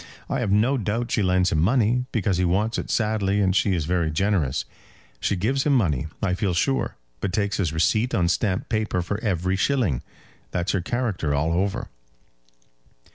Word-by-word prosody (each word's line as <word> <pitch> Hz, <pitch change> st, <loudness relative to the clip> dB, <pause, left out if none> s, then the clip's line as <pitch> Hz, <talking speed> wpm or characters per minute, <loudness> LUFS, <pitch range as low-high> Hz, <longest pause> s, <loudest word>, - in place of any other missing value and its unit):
I -, -, 0 dB
have -, -, -1 dB
no 120 Hz, +7 st, +3 dB
doubt 115 Hz, +3 st, -2 dB
she 110 Hz, -, +1 dB
lends 90 Hz, -1 st, +2 dB
him 80 Hz, -, +1 dB
money, 120 Hz, +5 st, +2 dB
because 100 Hz, -5 st, 0 dB
he 90 Hz, -, +1 dB
wants 100 Hz, +6 st, +1 dB
it -, -, -6 dB
sadly 105 Hz, -3 st, +1 dB
and 95 Hz, -2 st, +2 dB
she 100 Hz, -1 st, +2 dB
is 80 Hz, -4 st, -1 dB
very 85 Hz, -1 st, 0 dB
generous. 80 Hz, -5 st, 0 dB, 0.5 s
She -, -, 0 dB
gives 125 Hz, +9 st, 0 dB
him 145 Hz, -, +2 dB
money, 80 Hz, -, +1 dB, 0.2 s
I 95 Hz, -2 st, +1 dB
feel 90 Hz, -1 st, 0 dB
sure, 135 Hz, +9 st, 0 dB, 0.2 s
but 95 Hz, -, -2 dB
takes 100 Hz, +1 st, 0 dB
his 90 Hz, -6 st, 0 dB
receipt 110 Hz, +9 st, +1 dB
on 85 Hz, -2 st, +2 dB
stamped 95 Hz, +2 st, 0 dB
paper 110 Hz, -5 st, -1 dB
for 100 Hz, +4 st, -3 dB
every 95 Hz, -4 st, 0 dB
shilling. 100 Hz, -, +1 dB, 0.5 s
That's 90 Hz, +2 st, -1 dB
her 95 Hz, -, 0 dB
character 95 Hz, -, -1 dB
all 80 Hz, +3 st, +1 dB
over." 95 Hz, +3 st, -1 dB
95 Hz, 185 wpm, -24 LUFS, 90-110 Hz, 0.5 s, no